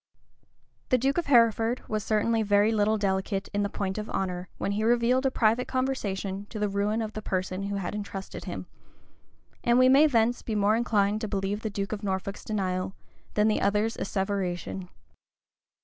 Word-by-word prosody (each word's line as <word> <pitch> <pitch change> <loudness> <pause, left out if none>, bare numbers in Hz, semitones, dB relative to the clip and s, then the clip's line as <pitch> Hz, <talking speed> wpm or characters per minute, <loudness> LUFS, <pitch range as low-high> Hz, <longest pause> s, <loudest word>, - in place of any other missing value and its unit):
[] - - -42
The 255 - +4
duke 270 +6 +1
of 340 - -3
Hereford 230 -2 +3
was 215 -1 -2
certainly 225 +2 +1
very 205 +1 +3
little 215 0 +2
delicate 195 0 -1
in 205 - +1
the 200 - 0
point 195 0 -3
of 210 - -6
honor, 180 -1 -3
when - - -2
he 210 +2 -1
revealed 240 +3 +3
a - - +3
private 235 0 +2
conversation 205 -7 -2
to - - -7
the 210 0 +1
ruin 205 +3 0
of 215 0 -5
the 215 - -5
person 185 -1 -2
who 200 - -2
had 195 0 -3
intrusted 200 -2 -6
him; - - -5 1.0
and 240 0 +4
we 255 0 +6
may 280 +4 +7
thence 240 -3 +2
be 220 - -3
more 210 +1 +3
inclined 215 -3 +1
to 215 - -2
believe 200 +1 -2
the 220 - -2
duke 200 -1 -3
of 210 -2 -3
Norfolk's 195 0 -3
denial, 185 -3 -2 0.4
than 210 0 +4
the 215 - +1
other's 210 +3 +1
asseveration. 190 -2 -3
210 Hz, 185 wpm, -27 LUFS, 195-225 Hz, 1.0 s, may